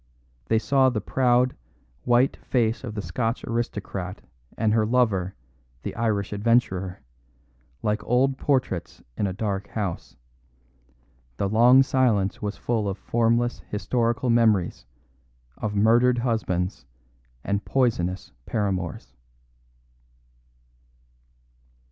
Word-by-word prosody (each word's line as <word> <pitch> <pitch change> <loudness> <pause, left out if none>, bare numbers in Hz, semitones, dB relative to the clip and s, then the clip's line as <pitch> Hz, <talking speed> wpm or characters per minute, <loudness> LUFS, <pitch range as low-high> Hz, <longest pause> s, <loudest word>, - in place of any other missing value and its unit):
They 110 - +3
saw 130 +3 +3
the 120 -4 -2
proud, 125 +3 +2 0.5
white 120 +2 +3
face 115 -2 0
of 115 -4 -6
the 105 - -3
Scotch 115 +2 -2
aristocrat 105 -5 -4 0.4
and 110 -1 +2
her 110 -1 +3
lover, 105 -6 +1 0.5
the - - -5
Irish 105 -3 -1
adventurer, 100 -5 +1 0.8
like 105 0 0
old 130 +2 +1
portraits 130 - -1
in 105 - 0
a - - -2
dark 100 0 -3
house. 100 -6 -4 1.2
The 100 - 0
long 120 +6 +6
silence 120 -5 +1
was 105 -1 -3
full 110 -4 -1
of 95 - -4
formless 120 +2 +1
historical 115 +3 0
memories 110 - +2 0.7
of 105 -1 -3
murdered 120 +4 +4
husbands 110 -7 -1 0.6
and 100 0 -1
poisonous 95 -9 0 0.2
paramours. 95 - -2
110 Hz, 105 wpm, -25 LUFS, 100-120 Hz, 1.2 s, long